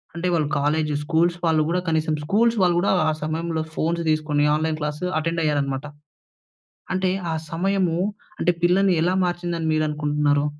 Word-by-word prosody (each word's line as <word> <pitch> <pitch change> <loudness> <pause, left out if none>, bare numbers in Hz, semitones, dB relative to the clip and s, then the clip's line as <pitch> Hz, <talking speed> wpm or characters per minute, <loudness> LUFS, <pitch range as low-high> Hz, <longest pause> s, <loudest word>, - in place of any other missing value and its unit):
అంటే 170 +2 -2
వాళ్ళు 155 -3 +1
college 150 +1 0
schools 170 +2 +1
వాళ్ళు 160 -2 +3
గూడా 180 +2 0
కనీసం, 160 -1 +1
స్కూల్స్ 225 +8 +2
వాళ్ళు 175 -1 +3
గూడా 185 - +1 0.2
ఆ - - +2
సమయంలో 160 +1 -2
ఫోన్స్ 170 +2 0
తీసుకొని, 155 -1 +1
ఆన్‌లైన్ 155 0 -1
క్లాస్ 150 0 -3 0.2
అటెండ్ 165 +1 -1
అయ్యారనమాట. 140 -2 -1 1.1
అంటే, 185 0 +1 0.2
ఆ - - -1 0.2
సమయము 180 0 0 0.4
అంటే 175 - +2
పిల్లల్ని 185 +1 +4
ఎలా 180 +2 +1
మార్చింది 175 -1 -2
అని 160 - -2
మీరు 155 0 +1
అనుకుంటున్నారు? 150 -1 +1
160 Hz, 160 wpm, -23 LUFS, 150-175 Hz, 1.1 s, పిల్లల్ని